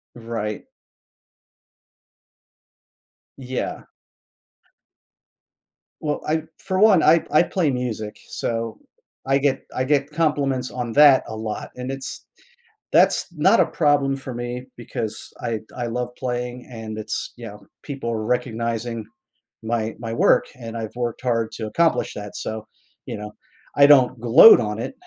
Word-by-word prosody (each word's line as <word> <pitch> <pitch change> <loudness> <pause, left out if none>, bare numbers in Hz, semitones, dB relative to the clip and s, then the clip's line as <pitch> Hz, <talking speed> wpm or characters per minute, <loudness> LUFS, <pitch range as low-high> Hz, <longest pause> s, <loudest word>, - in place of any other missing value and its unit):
Right. 115 -3 -5 2.7
Yeah. 130 -1 -5 2.2
Well, 150 -1 -2
I 155 0 0 0.2
for 185 0 -2
one, 205 -6 +6
I 165 +1 +5
I 155 - +5
play 170 -6 0
music, 115 -4 -4
so 115 -1 -3 0.5
I 135 +1 +3
get 135 -1 +1
I 130 - 0
get 140 +1 +1
compliments 145 -5 0
on 120 -2 -4
that 145 -3 +7
a 110 - -6
lot, 110 -1 -5
and 125 +1 -5
it's 135 0 -7 0.7
that's - - +4
not - - +4
a - - +4
problem 145 -4 +2
for 130 -2 -7
me 120 +1 -5
because 110 -2 -6
I - - -3
th - - -17
I 120 -1 -2
love 125 +1 -3
playing 125 -1 -4
and 110 -2 -7
it's 110 0 -4
yeah, 115 -4 -9 0.3
people 135 -5 -4
recognizing 115 0 -2 0.6
my 110 -1 -2
my 115 -1 -5
work - - +4
and 115 -2 -7
I've 110 +1 -6
worked 120 -1 -3
hard 115 -3 0
to 110 -2 -5
accomplish 165 +9 +1
that 105 0 -8
so, 110 0 -5 0.4
you - - -5
know, 105 0 -8 0.4
I 140 - +7
don't 130 -3 +6
gloat 125 - +9
on 105 0 -3
it, 120 - -4
120 Hz, 135 wpm, -22 LUFS, 115-135 Hz, 2.7 s, gloat